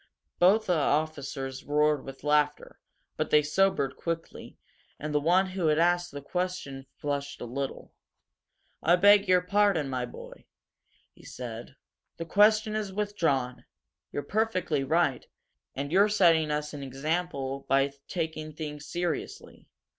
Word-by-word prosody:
Both 200 +5 +5
the 180 - +2
officers 140 -3 -2
roared 150 -1 +2
with 135 0 -10
laughter, 150 0 0 0.4
but - - -1
they 150 0 +5
sobered 150 -3 +1
quickly, 165 -1 -5 0.4
and 150 0 -4
the 150 - +3
one 180 +5 +3
who 185 -3 -1
had 150 -1 +3
asked 175 +1 +2
the 145 -1 -8
question 180 -6 -4
flushed 145 -1 -3
a - - -5
little. 135 +3 -5 0.9
"I 170 +2 +5
beg 205 +2 +6
your 180 -1 +4
pardon, 180 -6 +2
my 125 -1 -2
boy," - - -12 0.7
he - - -20
said. 120 +1 -8 0.4
"The 165 - -5
question 215 +4 +4
is 210 -2 -2
withdrawn. 165 -12 -1 0.5
You're 145 - -3
perfectly 185 - 0
right 140 -2 +1 0.5
and 140 +2 -4
you're 200 +4 +5
setting 170 -6 +4
us 150 0 -2
an 145 - -6
example 140 0 -3
by 135 +1 +3 0.2
taking 160 -2 -4
things 150 -1 -7
seriously. 175 -1 -4
155 Hz, 140 wpm, -28 LUFS, 140-180 Hz, 0.9 s, beg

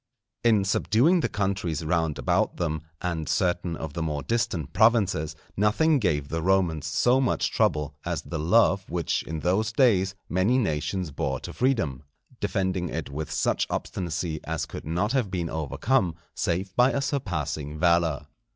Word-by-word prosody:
_ - - +7
In 105 -3 +3
subduing 120 - +3
the - - 0
countries 95 -6 -2
round 80 -2 0
about - - +1
them, 80 -3 -1 0.2
and 85 -3 -2
certain 90 -2 0
of 80 -2 -6
the 85 - -3
more 75 -3 -2
distant 115 - -1
provinces, 100 -9 +3 0.2
nothing 135 +10 +3
gave 75 - 0
the 80 0 -2
Romans 85 -4 +1
so 125 +11 +3
much 125 - +1
trouble, 75 -2 +1
as - - -3
the 80 - -5
love 95 +3 +3
which 85 -1 -1
in 80 -1 -5
those 100 +6 +1
days 100 -6 +3
many 95 +8 +2
nations 90 - -1
bore 70 -1 -2
to - - -7
freedom, 110 - 0 0.4
defending 95 -3 -1
it 75 -3 -4
with 75 +2 -4
such - - +1
obstinacy 85 -3 -3
as - - -2
could - - -8
not 90 +7 0
have 130 -6 +1
been 85 -3 -3
overcome 85 - 0 0.2
save 95 +3 -2
by 125 +2 +5
a - - 0
surpassing 80 - -3
valour. 85 -3 +2
90 Hz, 160 wpm, -26 LUFS, 80-105 Hz, 0.4 s, _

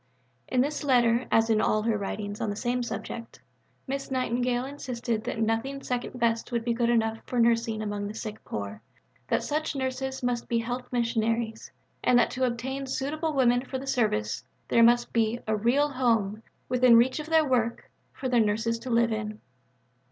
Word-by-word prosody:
In 250 - +2
this 295 +3 -1
letter, 245 -3 +3
as 225 0 +4
in 215 -1 +3
all 215 -1 +2
her 225 -1 +1
writings 205 0 -4
on 215 - 0
the 205 - -3
same 245 +3 -1
subject, 230 0 -6 0.5
Miss 275 0 -4
Nightingale 250 -1 0
insisted 245 -5 -3
that - - -3
nothing 225 +5 -1
second 250 0 -3
best 230 0 0
would 235 -1 -1
be 235 - +1
good 235 0 +1
enough 225 -1 +1
for 250 - -1
nursing 230 -2 +2
among 205 -1 -3
the 210 - -7
sick 220 -1 -6
poor, 100 0 -5 0.5
that - - +1
such 305 0 -2
nurses 265 0 -3
must 245 -1 -1
be 235 - +2
health 245 +2 -3
missionaries, 230 -1 -1 0.3
and 245 - +5
that 240 - +3
to 260 0 0
obtain 265 +3 -3
suitable 305 +5 -2
women 245 -2 +4
for 265 0 -4
the 265 - -7
service 130 - 0 0.3
there 235 - +4
must 240 +1 +4
be 230 0 +1
"a 220 -1 +1
real 250 +7 +2
home, 225 -6 +1 0.3
within 250 -1 +5
reach 255 +5 +3
of 305 - -6
their 320 -2 +4
work, 235 -3 0 0.2
for 265 - -5
the 250 -2 +3
nurses 225 +2 +1
to 255 - -7
live 235 -1 +3
in." 215 0 -3
235 Hz, 185 wpm, -27 LUFS, 225-255 Hz, 0.5 s, and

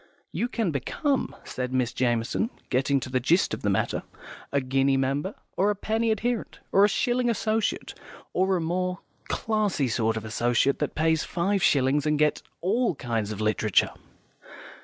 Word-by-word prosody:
"You 240 - -1
can 225 -7 -1
become," 270 - -1
said 125 0 -4
Miss 125 -2 0
Jamison, 120 - 0 0.2
getting 135 +2 +2
to - - -5
the 130 - +2
gist 165 +9 +2
of - - -4
the 100 - 0
matter, 95 - 0 0.5
"a 140 - +2
guinea 135 +1 +2
member, 140 +8 -1 0.2
or 200 +2 +2
a 210 - +1
penny 220 +3 0
adherent, 225 +2 -1
or 195 - +5
a 205 - +6
shilling 245 +3 +1
associate, 220 -1 -1 0.4
or 190 +1 +2
a - - -2
more 180 +2 -1 0.3
classy 210 -10 0
sort 110 -1 +1
of 110 - -5
associate, 120 +4 +1
that - - -2
pays 160 0 +2
five 190 +3 0
shillings 145 -3 +3
and 150 0 +2
gets 150 0 +2 0.2
all 215 +1 +1
kinds 115 -6 -2
of 110 0 -5
literature." 110 -1 +2
150 Hz, 165 wpm, -26 LUFS, 130-205 Hz, 0.5 s, a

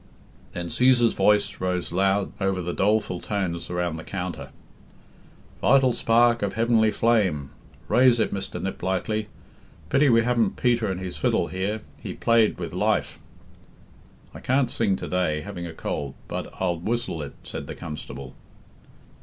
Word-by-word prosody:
Then 85 -1 -4
Cæsar's 125 0 +4
voice 105 0 +2
rose 90 -1 -1
loud 95 +2 +1
over 95 -1 +1
the 90 0 -3
doleful 105 -3 +1
tones 90 -5 -3
around 90 -2 -2
the 80 - -7
counter. 90 -3 -5 1.1
"'Vital 130 -2 +4
Spark 120 +1 +3
of 100 -1 -1
Heavenly 115 -1 +3
Flame' 100 - +1 0.4
raise 125 -1 +5
it, - - +1
Mr. 100 - -4
Niplightly. 95 +3 -2 0.6
Pity 140 - +4
we 115 -1 +5
haven't 120 -1 +1
Peter 120 -4 +2
and 95 - -3
his 95 -1 -5
fiddle - - +1
here 95 +5 -2 0.2
he - - -6
played 115 -2 +3
with 85 -3 -5
life." 105 +4 0 1.1
"I - - -9
can'd 130 -1 +1
sing 105 -4 +1
to - - -6
day, 85 -4 0
having 90 -1 -6
a - - -7
cold, 70 -3 -4
bud - - -4
I'll 90 -3 0
whisle 115 -3 -2
id," 70 -1 -7
said - - -7
the - - -6
Constable. 70 -3 -8
100 Hz, 150 wpm, -25 LUFS, 90-115 Hz, 1.1 s, raise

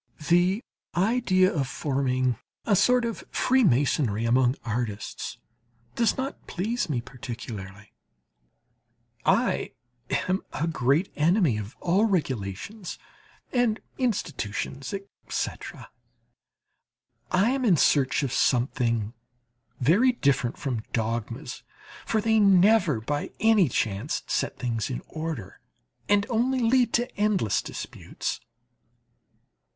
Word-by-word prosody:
The 180 +5 +3 0.3
idea 190 -1 +3
of 140 -4 0
forming 130 -3 0 0.3
a 205 - +3
sort 245 +5 +4
of 230 -2 -4
freemasonry 140 - +2
among 125 +2 +3
artists 110 -3 -4 0.6
does 230 -1 +1
not 265 +1 -5
please 220 +3 -2
me 125 -5 0
particularly; 110 -5 -8 1.3
I - - +2 0.5
am 185 +1 +1
a 160 - -1
great 160 +2 +1
enemy 160 - +3
of 105 +1 -7
all 190 +5 +3
regulations 165 - -3 0.5
and 245 -4 +2 0.2
institutions, 140 - -2 0.4
etc. - - -5 1.4
I 200 +6 +3
am 270 0 -1
in 195 -9 +4
search 140 0 +3
of 135 -3 -2
something 120 -4 +1 0.7
very 200 - +4
different 135 - +1
from 125 -6 -3
dogmas, 115 +4 -3 0.5
for 220 - +1
they 220 0 +3
never 195 - +5
by 145 +6 -2
any 215 -7 +4
chance 110 +4 -1
set - - -1
things 115 -2 -2
in 125 - -4
order, 155 - -5 0.5
and 205 0 +4
only 255 +2 +1
lead 240 +1 +3
to 240 +1 0
endless 205 - +2
disputes. - - -5
155 Hz, 105 wpm, -26 LUFS, -, 1.4 s, never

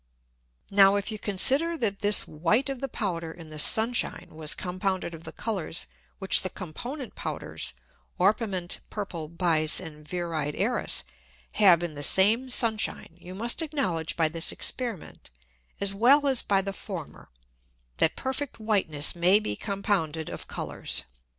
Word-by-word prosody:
Now, 195 0 +6
if 205 +2 -2
you 215 - -5
consider, 270 - +2
that 205 -7 -1
this 205 0 +3
White 205 - 0
of 270 - -7
the 275 - -2
Powder 170 -9 -4
in 165 -1 -12
the 155 0 -7
Sun 220 +9 +5
shine - - -2
was 155 -1 -2
compounded 185 -1 -3
of 165 +1 -11
the 160 - -7
Colours 190 -7 -3 0.3
which 195 -1 +5
the 185 - -3
component 240 - -7
Powders - - -4 0.5
(Orpiment, 190 -2 0
Purple, 175 -7 -5
Bise, 165 -2 +1
and 155 -4 -10
Viride 160 -3 -3
Æris) - - -1 0.5
have 175 -4 +5
in 170 -3 -4
the 145 - -7
same 215 - +6
Sun 230 -3 +5
shine, 165 - -3
you 180 +1 -11
must 235 - +1
acknowledge 265 - -2
by 165 -2 +3
this 165 +1 0
Experiment, 235 -9 -3 0.5
as 200 -1 +2
well 260 +8 +4
as 265 -3 +3
by 195 -1 +1
the 195 0 -4
former, 185 -7 -8 0.7
that 160 - +2
perfect 265 0 -4
Whiteness 190 -10 +1
may 180 +4 +5
be 155 - -3
compounded 195 - -2
of - - -8
Colours. - - -2
195 Hz, 155 wpm, -27 LUFS, 165-220 Hz, 0.7 s, Now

